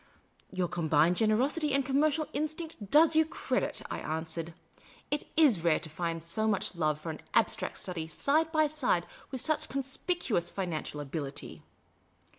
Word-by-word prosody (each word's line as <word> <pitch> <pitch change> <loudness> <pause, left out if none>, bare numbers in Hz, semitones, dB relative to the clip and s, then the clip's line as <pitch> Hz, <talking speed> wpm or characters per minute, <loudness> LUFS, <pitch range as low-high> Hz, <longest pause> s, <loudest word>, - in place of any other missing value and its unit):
" - - -34
Your 185 -1 0
combined 165 0 +2
generosity 270 +8 +2
and 275 -1 +1
connnercial 300 +3 +2
instinct 310 - -4
does 310 +4 +6
you 320 - +6
credit," 320 - -2
I - - -3
answered. 160 +1 -4 0.6
"It 295 - -1
is 260 - +5
rare 165 -3 +4
to 155 - -7
find 165 +1 -3
so 215 +7 -1
much 205 -4 0
love 155 -3 0
for 160 +1 -5
an 155 - -9
abstract 230 - +1
study 170 -4 -3
side 305 - +1
by 310 -1 +4
side 265 - 0 0.2
with 260 -3 -3
such 310 -2 +1
conspicuous 265 - -1
financial 155 -6 -3
abilit} 140 -1 -5
210 Hz, 155 wpm, -30 LUFS, -, 0.6 s, does